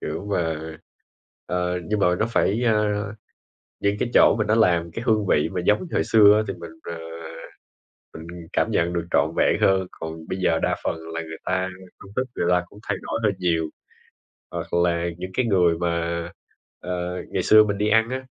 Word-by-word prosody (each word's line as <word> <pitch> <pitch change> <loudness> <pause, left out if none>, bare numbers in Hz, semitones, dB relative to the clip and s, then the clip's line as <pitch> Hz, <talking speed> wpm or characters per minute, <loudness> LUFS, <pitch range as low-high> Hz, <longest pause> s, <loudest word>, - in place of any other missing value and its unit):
kiểu, 100 - -5
mà, - - +1
ờ, 80 0 -5 1.0
ờ, 90 - -2
nhưng 105 +4 -1
mà - - +4
nó 110 - +1
phải, 115 0 +1
ơ 105 -2 +1 0.7
những 100 0 +1
cái 120 - -1
chỗ - - +6
mà 105 - +1
nó 110 - +4
làm 85 -7 +3
cái 115 - -5
hương 110 -3 +2
vị 75 -2 +2
mà 90 - -1
giống 105 - +4
thì 175 - -7
hồi - - +2
xưa 105 -2 +6
á 110 - +3
thì 95 - -2
mình, - - -9
ờ, 85 -1 -6 1.2
mình 80 +1 -9 0.3
cảm - - +1
nhận 85 +1 +1
được 85 -1 -2
trọn - - +2
vẹn - - +3
hơn, 95 -1 +3
còn 80 0 -8
bây 95 - -3
giờ 85 -3 +2
đa - - +1
phần - - -1 0.2
là 85 - -2
người 80 0 -8
ta 95 0 0 0.3
công 95 - -13
thức 130 - +1
người - - 0
ta 90 0 +3
cũng 100 - -17
thay 100 - 0
đổi 115 - -3
hơi 105 -2 +3
nhiều. 85 -3 0 0.8
Hoặc - - -5
là 85 0 +2
những 95 +1 -6
cái 125 - +1
người 90 -6 +3
mà, 85 0 -1 0.6
ờ, 90 0 -4
ngày - - -1
xưa 110 0 +7
mình 100 -1 -2
đi 105 +1 +1
ăn 110 +1 +4
á, 130 0 -4
95 Hz, 210 wpm, -23 LUFS, 85-105 Hz, 1.2 s, xưa